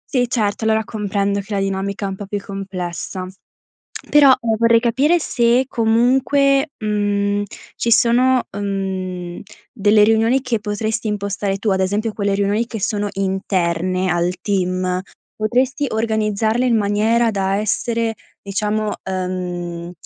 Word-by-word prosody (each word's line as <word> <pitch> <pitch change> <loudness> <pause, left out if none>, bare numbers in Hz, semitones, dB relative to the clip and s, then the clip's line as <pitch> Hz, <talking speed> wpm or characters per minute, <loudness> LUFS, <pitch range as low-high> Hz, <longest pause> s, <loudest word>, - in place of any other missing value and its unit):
Sì, 245 -1 +3
certo, 215 -3 -1
allora, 220 0 +2
comprendo 200 -2 -1
che 200 +1 -6
la 195 - +1
dinamica 195 +1 -2
è - - -1
un 190 - -4
po' 200 0 -8
più 205 +1 -3
complessa, 190 -2 -5 0.8
però, 285 -2 +7
ehm, 225 -2 0
vorrei 230 0 +4
capire 270 +9 +2
se, 245 -3 +2
comunque, 265 +5 +2
mhmm, 205 -1 0 0.3
ci 235 - -1
sono, 245 +2 +4
ehm, 190 -3 -4 0.3
delle 210 -2 +3
riunioni 225 +4 +3
che 250 -3 -1
potresti 215 +1 -2
impostare 200 -1 -2
tu, 210 +2 -2
ad 190 -1 +2
esempio, 210 +4 -1
quelle 200 -1 0
riunioni 205 +3 0
che 225 -2 -6
sono 205 0 -1
interne 185 -2 -1
al 175 +1 +1
team, 185 -2 -1 0.3
potresti 255 +6 0
organizzarle, 220 +1 0
in 245 -2 +3
maniera 220 +3 +2
da 195 -1 0
essere, 225 +2 -1 0.3
diciamo, 210 +1 -2
ehm, 180 -2 -4
210 Hz, 135 wpm, -19 LUFS, 195-230 Hz, 0.8 s, però